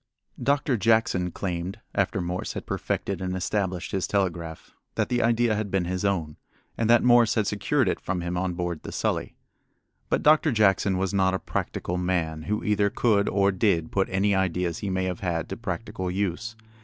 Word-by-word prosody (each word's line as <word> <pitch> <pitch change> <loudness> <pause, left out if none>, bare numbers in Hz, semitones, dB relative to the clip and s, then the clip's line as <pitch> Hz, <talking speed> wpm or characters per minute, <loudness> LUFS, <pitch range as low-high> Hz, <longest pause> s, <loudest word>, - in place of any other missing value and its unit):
Doctor 140 -2 +2
Jackson 105 -4 +2
claimed, 90 +1 -4
after - - 0
Morse 90 +1 -3
had - - -6
perfected 100 -3 -2
and 90 0 -2
established 95 -1 -2
his 95 -2 -1
telegraph, 85 -5 -2 0.2
that - - 0
the 120 -1 +1
idea 115 0 +3
had 105 -1 -2
been 95 -2 0
his 90 +2 -2
own, 85 -7 -1 0.4
and 115 -1 0
that 120 0 +6
Morse 120 -2 +5
had 110 - +2
secured 100 -2 +1
it - - 0
from 90 -2 -3
him 85 +1 -3
on 90 0 -1
board 85 -2 -3
the - - -7
Sully. - - -2 0.7
But - - +1
Doctor 155 0 +5
Jackson 100 -3 +3
was 95 0 -1
not 95 -1 +2
a - - -2
practical 90 +1 -3
man 85 -4 -1
who 105 0 0
either 105 -1 +2
could 100 -2 +2
or 100 0 +3
did 90 -4 +1
put 95 -1 +1
any 100 +2 +2
ideas 90 -3 0
he 100 - -3
may 95 0 0
have 90 -2 -2
had 85 -3 -2
to - - -3
practical 95 -1 -4
use. 100 +4 -2
95 Hz, 190 wpm, -26 LUFS, 90-105 Hz, 0.7 s, that